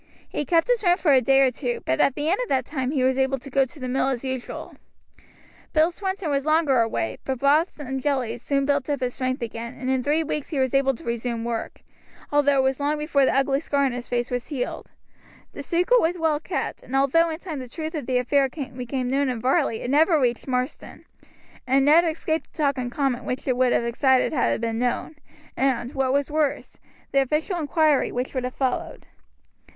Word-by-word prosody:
He 295 - -3
kept 330 +3 +2
his - - +1
room 355 -1 +4
for 305 -7 +3
a 260 - +5
day 270 +2 +4
or 265 -1 +4
two; 245 -1 -3
but 130 - 0
at 270 - +3
the 295 +1 -2
end 370 +7 +2
of - - -4
that 260 -2 +1
time 260 -3 -3
he 275 -2 0
was 260 +1 +2
able 265 0 +1
to 270 +2 -12
go 270 +1 +3
to 265 +3 -14
the 255 - -4
mill 260 +1 0
as 255 -2 -3
usual. 260 -2 -5 1.0
Bill 315 +2 +4
Swinton 380 -3 -3
was 275 -1 0
longer 310 -5 +3
away, 165 - -2
but 265 -1 -2
broths 295 +6 +2
and 265 -2 -4
jellies 250 -5 -1
soon 275 +1 0
built 285 0 0
up 285 -2 0
his 250 -1 -1
strength 255 -1 -2
again, 230 0 -6
and 260 +1 -1
in 260 -1 +1
three 300 +5 +1
weeks 300 -2 -4
he 305 - -3
was 260 -1 +1
able 270 -1 +2
to - - -14
resume 235 0 -3
work, 235 -1 -4 0.5
although 285 -1 +3
it 265 - +3
was 265 +1 0
long 290 +1 0
before 300 -2 +2
the - - +1
ugly 275 0 +2
scar 285 -2 0
on 265 - +1
his 245 0 -6
face 240 0 -1
was 245 0 -3
healed. 265 -5 -4 0.6
The - - -7
secret 360 +8 +2
was 340 +2 0
well 320 -3 +1
kept, - - -4
and 265 - -6
although 275 +5 +3
in 320 - -4
time 330 -5 -6
the 255 -1 -8
truth 315 +5 -5
of 300 -7 -5
the 255 -1 +1
affair 270 +2 +2
became 255 -2 -4
known 270 +1 +1
in 245 -2 -2
Varley 255 -1 +1
it 245 - -3
never 315 +2 +4
reached 245 -1 0
Marsden, 255 +2 -4 0.6
and 270 +1 +3
Ned 320 +4 +6
escaped 320 0 -2
the - - -21
talk 280 -3 +1
and 245 -1 -3
comment 270 -2 -1
which 255 +3 -4
it 255 - +2
would 255 0 +2
have - - +2
excited 260 +3 +2
had 245 -5 +2
it - - -3
been 225 -1 -2
known, 250 +5 -2 0.4
and, 260 -2 0
what 265 -1 0
was 280 +1 0
worse, 300 -2 -1 0.3
the 275 - +4
official 305 +7 -1
inquiry 310 -2 +2
which 250 +2 -3
would 255 -2 -2
have 250 - -5
followed. 260 -2 -2
270 Hz, 230 wpm, -24 LUFS, 250-300 Hz, 1.0 s, Ned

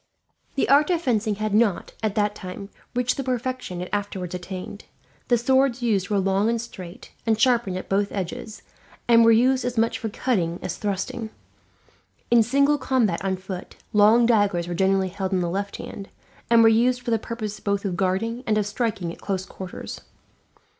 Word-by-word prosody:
The 275 - +1
art 290 +3 +5
of 350 -2 +2
fencing 220 -8 0
had 215 0 -2
not, 210 -3 +2
at 215 -2 -1
that 205 -1 +1
time, 195 0 -8 0.3
reached 250 +2 +1
the 275 - -2
perfection 255 -7 -3
it 180 - -5
afterwards 195 -3 -3
attained. 185 +3 -7 0.4
The 240 - +4
swords 260 +1 +2
used 205 -5 +1
were 205 - +1
long 195 +2 +2
and 235 0 0
straight, 195 -3 -9 0.2
and 220 -1 +2
sharpened 235 -7 +2
at - - -7
both 200 +1 0
edges; 200 +3 -5 0.4
and 230 -1 +6
were 230 - +6
used 255 +3 +4
as 245 -1 -3
much 225 +1 +1
for 225 - -3
cutting 185 -7 -1
as 175 - -3
thrusting. 205 +2 -3 1.0
In 240 -1 +7
single 280 +5 +3
combat 235 -10 +1
on 190 -1 0
foot, 185 -1 -8 0.2
long 215 +3 +6
daggers 205 -7 +2
were 175 - -3
generally 190 +1 +2
held 190 +1 -3
in 185 - +2
the 175 - 0
left 200 +2 -3
hand, 195 - -8 0.4
and 230 -1 +6
were - - +7
used 240 +3 +3
for 235 - -2
the 225 - +2
purpose 215 -2 -5
both 200 0 -1
of 185 -3 -1
guarding 200 +7 -1
and 215 -1 +2
of 210 - +1
striking 205 -5 -2
at - - -15
close 190 -2 -2
quarters. 190 -1 -8
210 Hz, 190 wpm, -24 LUFS, 190-235 Hz, 1.0 s, In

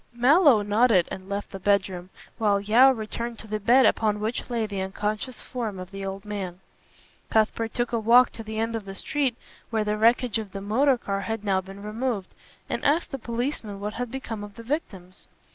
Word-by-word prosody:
Mallow 260 - +5
nodded 205 -3 +3
and 190 0 -7
left 200 0 -4
the 195 - -7
bedroom, 190 -2 0 0.3
while 205 -2 +3
Yeo 225 +6 +6
returned 235 -1 -3
to - - -8
the 215 0 -3
bed 245 +5 +5
upon 210 -2 +2
which 220 +4 -3
lay 235 -2 0
the 200 -2 -4
unconscious 210 +6 -3
form 225 -6 -4
of 185 0 -8
the 195 0 -6
old 195 +1 -5
man. 190 -4 -5 0.7
Cuthbert 225 +1 +1
took 240 -1 -1
a 235 - +1
walk 235 +3 +6
to - - -8
the 220 0 -6
end 225 +1 -1
of 220 -3 -4
the 195 0 -7
street 265 +2 -1 0.3
where 220 -2 0
the 210 0 -1
wreckage 235 +1 +3
of 210 -3 -7
the 195 - -4
motor 250 +7 +2
car 200 -3 -3
had 225 +2 -4
now 195 -2 +1
been 195 +1 -11
removed, 215 -2 -3 0.3
and - - -3
asked 310 +4 +2
the 275 - -4
policeman 235 -3 -3
what 210 +1 -4
had 245 +1 -4
become 225 -4 -5
of 205 -1 -10
the 230 - -10
victims. 195 - -5
215 Hz, 205 wpm, -26 LUFS, 200-240 Hz, 0.7 s, Yeo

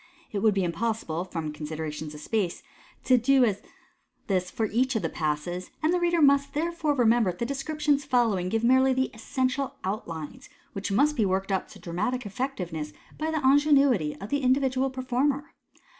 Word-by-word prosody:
t 205 - -2
would 210 0 +3
be 195 - +1
impossible, 175 -2 -2
from 165 -4 -5
considerations 155 0 -5
of - - -9
space, 195 0 -2 0.4
to 255 -1 +4
do 270 +3 +4
this 210 -5 +2 0.7
as 180 -2 +1
j 220 - -1
each 255 +4 +1
of 220 - 0
the 165 - 0
Passes, 160 +4 -3
and 320 +2 +3
the 360 - +2
reader 345 -2 +2
must 280 0 +3
therefore 320 -1 0
remember 235 -4 +3
that 180 - -5
the 235 - -2
descriptions 290 +2 0
following 230 -9 +1
give 225 +3 0
merely 260 +2 +4
the 260 0 0
essential 255 +4 -2
outlines, 170 -6 -5 0.2
which 195 0 -4
must 290 +9 +3
be 225 - +2
worked 195 0 0
up 190 - 0
to - - -14
dramatic 215 +9 -3
effectiveness 180 - -4 0.3
by 310 +1 -1
the 315 -4 0
ingenuity 275 - +4
of 200 - -7
the 285 - +1
individual 265 0 +2
performer. 265 +3 -1
235 Hz, 175 wpm, -27 LUFS, 185-275 Hz, 0.7 s, to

